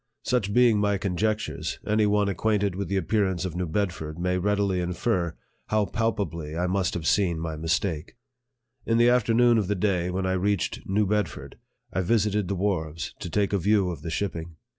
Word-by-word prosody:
Such 120 -6 0
being 120 -1 +4
my 100 -1 +2
conjectures, 100 -4 -2
any 105 0 +2
one 105 0 +2
ac 100 - 0
quainted 105 -2 +1
with 100 +2 -3
the 100 - 0
appearance 95 -1 0
of 90 -3 -4
New 90 0 -2
Bedford 80 -3 -2
may 90 +1 -1
very - - -1
readily 100 -1 +1
infer 90 -1 -1 0.3
kow 110 -1 +2
palpably 90 -9 -2
I 90 - 0
must 95 0 0
have 85 -3 -4
seen 90 -2 +2
my 80 -1 -3
mistake. 80 +4 -2 0.7
In 115 - +1
the 120 +1 +5
afternoon 120 -1 +4
of 100 - -1
the 105 - 0
day 90 -2 0
when 95 +1 -2
I 95 - +1
reached 95 0 -1
New 105 +2 +2
Bedford, 105 -2 -2 0.4
I 95 - +1
visited 105 0 +1
the 100 - -1
wharves, 85 -6 -2
to - - -5
take 100 +3 0
a 100 - +2
view 100 0 +2
of 80 -4 -7
the 85 - -5
shipping. 85 -2 -3
95 Hz, 195 wpm, -26 LUFS, 85-105 Hz, 0.7 s, the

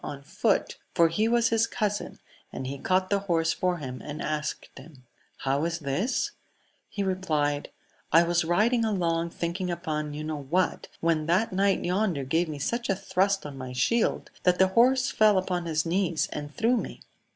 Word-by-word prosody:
199 140 0 -8 0.2
foot, - - -11 0.2
for 170 -2 +5
he 210 +7 +1
was 235 0 +3
his 225 0 +2
cousin, 210 -3 -2 0.3
and 130 - -5
he 135 +1 -5
caught 185 +3 +1
the 200 - +3
horse 165 -4 +1
for 180 -1 0
him, 130 -5 -6
and 150 0 -6
asked 150 0 -4
him, 135 -1 -14 0.3
How 140 +2 0
is 165 0 -1
this 170 - -1
1 - - -32 0.5
He 200 - -3
replied, 155 -7 -1 0.4
I 165 +2 +7
was 170 0 +1
riding 215 +8 +2
along 170 -6 0
thinking 175 +2 -3
upon 155 -4 -3
you 150 - -5
know 155 -1 -4
what, 175 +7 0
when 165 -2 +1
that 185 +5 +2
knight 195 +1 +2
yonder 180 -5 0
gave 160 +6 0
me 150 - -5
such 235 +12 -2
a 195 - +3
thrust 195 0 0
on 140 -2 -7
my 130 0 -6
shield 225 - +1
that 180 -1 +3
the 190 0 +4
horse 255 +6 +4
fell 215 -2 +4
upon 180 -2 -1
his 155 -1 0
knees 170 -1 0
and 145 0 -5
threw 230 +9 +2
me. - - -5
175 Hz, 185 wpm, -27 LUFS, 150-200 Hz, 0.5 s, I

